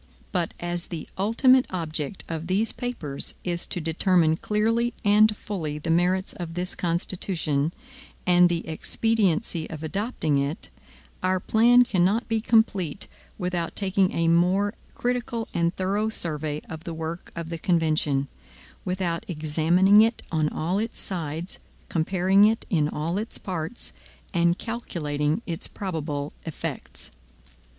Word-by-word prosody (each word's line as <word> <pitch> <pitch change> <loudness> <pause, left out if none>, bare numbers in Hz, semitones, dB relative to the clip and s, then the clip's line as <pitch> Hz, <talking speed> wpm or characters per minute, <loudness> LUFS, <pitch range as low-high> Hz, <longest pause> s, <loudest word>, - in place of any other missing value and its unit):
But 175 -3 -1
as 175 0 -3
the 165 -4 -6
ultimate 250 +6 +4
object 160 -1 -3
of 165 0 -4
these 200 +5 +2
papers 165 - -3
is 175 -1 -1
to - - 0
determine 165 0 +3
clearly 225 +4 +1
and 210 +1 +5
fully 160 -8 -4
the 165 +2 -2
merits 180 +3 +2
of 170 -2 -6
this 180 +1 -2
Constitution, 170 -3 0 0.5
and 180 0 +6
the 170 -1 -2
expediency 185 0 +1
of 160 -1 -7
adopting 160 - 0
it, 140 +5 -2 0.5
our 185 0 +1
plan 240 +5 +5
cannot 195 +1 +1
be 225 -1 0
complete 200 -7 +2 0.3
without 180 -3 -2
taking 195 -1 +2
a 165 0 0
more 180 +5 +3 0.2
critical 245 -2 -2
and 170 +1 +1
thorough 200 +3 0
survey 155 -6 -3
of 160 0 -8
the 170 - -5
work 160 +2 -5
of 165 -1 -5
the 165 -1 -4
convention, 155 -6 +1 0.6
without 180 -2 -1
examining 170 +5 +4
it 225 +1 +2
on 155 -2 +1
all 175 +7 -1
its 225 +1 -3
sides, 165 -1 -3 0.3
comparing 185 +4 +4
it 220 +1 +1
in 150 -5 +2
all 165 +6 -2
its 220 +2 -5
parts, 180 +4 -5 0.4
and 170 0 +3
calculating 155 -7 -2
its 165 -2 -5
probable 155 -6 -4
effects. 165 - -6
175 Hz, 135 wpm, -25 LUFS, 160-205 Hz, 0.6 s, and